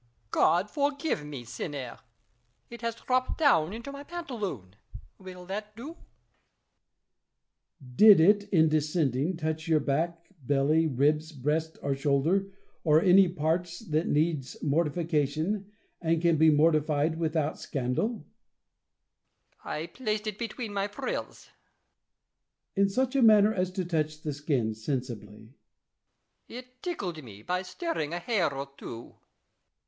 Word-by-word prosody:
Louis. 120 - -36 0.2
God 175 +6 +3
forgive 285 - -1
me, 145 -4 -7
sinner! 135 +2 -6 0.7
It 235 - -9
has 230 -1 -2
dropped 255 +2 -1
down 185 - +3
into 235 +6 -7
my 280 0 -8
pantaloon: 220 - -6 0.4
will 185 -1 -10
that 210 +3 -6
do 240 +6 -8
1 - - -8
La - - -26
Chaise. 125 -2 -25
Did 210 -4 +9
it, 205 +5 +5
in 160 -4 +4
descending, 155 0 0
touch 160 0 -3
your 160 -2 +4
back, 165 +4 -1 0.2
belly, 145 +4 +2
ribs, 150 +3 +1
breast, 155 +3 -2
or 140 - 0
shoulder, 145 +8 +1 0.4
or 155 -1 +5
any 185 +1 +6
parts 170 +1 -1
that 155 +2 +1
needs 150 -3 0
mortifica 155 0 +1
tion, 195 +7 -3 0.3
and 165 -1 +1
can 170 0 +3
be 160 +1 +5
mortified 155 0 +2
without 160 -2 -1
scandal? 125 - -1
Louis. 215 -10 -10 1.4
I 155 - -4
placed 215 +3 -3
it 210 -1 -4
between 230 -2 -5
my 200 0 0
frills. 485 - -5
La - - -26
Chaise. 200 0 -7
In - - -4
such 255 +6 0
manner 215 -4 +6
as 185 -2 0
to 185 -1 -2
touch 155 -2 -2
the 150 - -2
skin 140 -6 -1
sensibly? 120 -1 -4
Louis. 110 +3 -16 1.1
It 250 0 -16
tickled 180 - -4
me, 105 -3 -12
by 180 +5 -1
stirring 190 - -3
a - - -3
hair 185 -5 0
or 140 0 -5
two. 115 0 -9
165 Hz, 145 wpm, -28 LUFS, 145-205 Hz, 1.4 s, Did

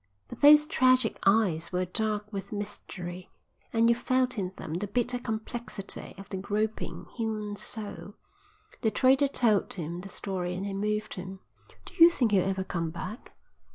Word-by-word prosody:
But - - -10
those 300 +1 +8
tragic 255 -5 +3
eyes 190 -6 +3
were 180 0 0
dark 210 +2 -2
with 195 0 -5
mystery, 185 -4 -6 0.4
and 230 0 +3
you 235 - +6
felt 255 +1 +1
in 185 -2 -2
them 155 - -6
the 190 +5 -2
bitter 245 +4 0
complexity 220 -2 -2
of 195 - -10
the 190 - -4
groping, 210 +3 -3
human 215 -2 -2
soul. 205 0 -5 0.7
The 220 - +3
trader 265 +6 +4
told 230 -7 +2
him 170 0 -5
the 195 - -9
story 180 -2 -3
and 190 +2 -4
it 200 - -4
moved 210 +2 -2
him. 190 +1 -8 0.4
"Do - - -12
you 335 - +10
think 245 -10 0
he'll 195 -2 +4
ever 190 0 -1
come 170 -3 -3
back?" 195 +8 -8
210 Hz, 165 wpm, -28 LUFS, 190-230 Hz, 0.7 s, you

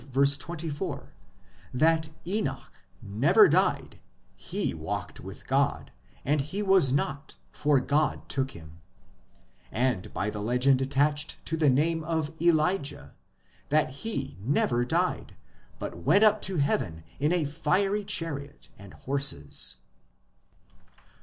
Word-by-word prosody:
24 145 +3 -1 0.6
that 160 +4 +2 0.2
Enoch 205 +5 -3 0.3
never 105 +8 +5
died - - +1 0.2
" 65 - -32
ho - - -1
walked - - -5
with - - -10
God; - - 0 0.3
and 145 +1 +2
he 180 +9 -4
was 190 -9 +5
not, 140 +1 -2 0.2
for 145 -2 +2
God 145 +4 0
took 135 -1 0
him 80 -6 -13 0.5
"; - - -34 0.2
and 120 -5 -1
by 105 +2 -2
the 105 - -5
legend 125 +4 +3
attached 145 +2 +1
to 165 - -1
the 155 -3 +3
name 160 +5 +1
of 160 -1 -2
Elijah, 155 - +1 0.6
that 150 -2 +2
he 135 - -4
never 120 0 +1
died, 120 - -1 0.4
but 85 - -6
went 170 - +4
up 215 -1 +5
to 190 - -1
heaven 85 - 0 0.2
in 150 +3 +2
a 175 -3 +1
fiery 185 +8 0
chariot 145 -7 -4
and 100 -1 -12
horses. 135 - -2
145 Hz, 125 wpm, -28 LUFS, 130-165 Hz, 0.6 s, never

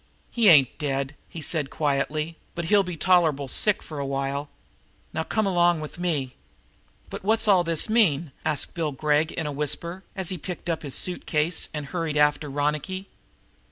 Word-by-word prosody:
"He 230 -4 +4
ain't 140 -7 +5
dead," 140 -1 -2 0.2
he 165 - -8
said 150 -4 -1
quietly, 150 +3 -1 0.2
"but 170 - -3
he'll 205 +4 +5
be 180 -3 -5
tolerably 160 -7 +3
sick 210 +8 +2
for 155 -2 -7
a 140 - -2
while. 140 +1 -2 0.6
Now 160 - -1
come 215 +6 0
along 175 -3 +3
with 155 +2 -8
me." 150 -8 -1 0.8
"But - - -6
what's 220 +2 +3
all 190 -4 +5
this 165 -2 +1
mean?" 175 - +2
asked 150 - -1
Bill 160 -4 -2
Gregg 150 +3 +1
in 165 - -4
a 150 - -2
whisper, 170 +6 -2
as 190 -4 0
he 185 - -2
picked 175 +1 -4
up 160 - -3
his 140 -3 -3
suit 180 -1 -1
case 160 +2 +1
and 150 -2 -5
hurried 160 -1 -3
after 150 0 +2
Ronicky. 150 +7 -2
160 Hz, 180 wpm, -25 LUFS, 145-180 Hz, 0.8 s, ain't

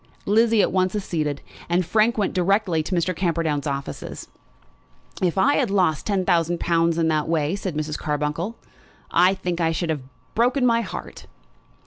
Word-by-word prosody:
Lizzie 225 +1 +4
at - - +1
once 185 +1 +1
acceded, 155 -8 -2 0.3
and 175 +1 +2
Frank 220 +6 +2
went 205 -3 0
direct 195 +4 +2
to 185 - -5
Mr. 170 +2 0
Camperdown's 165 -5 -1
offices. 140 0 -5 0.9
"If 180 -1 +1
I 280 +9 +4
had 255 -6 +1
lost 180 -7 +1
ten 195 -3 0
thousand 170 -1 +1
pounds 170 -1 +1
in 165 -1 +2
that 155 -1 0
way," 160 +1 +1
said 190 -5 -4
Mrs. 150 0 -3
Carbuncle, 150 +8 -2 0.5
"I 180 +3 +4
think 180 -2 -3
I 165 -1 +2
should 165 0 -1
have 150 -3 -3 0.3
broken 250 +3 +2
my 230 -1 +3
heart." - - -8
175 Hz, 165 wpm, -23 LUFS, 160-200 Hz, 0.9 s, Lizzie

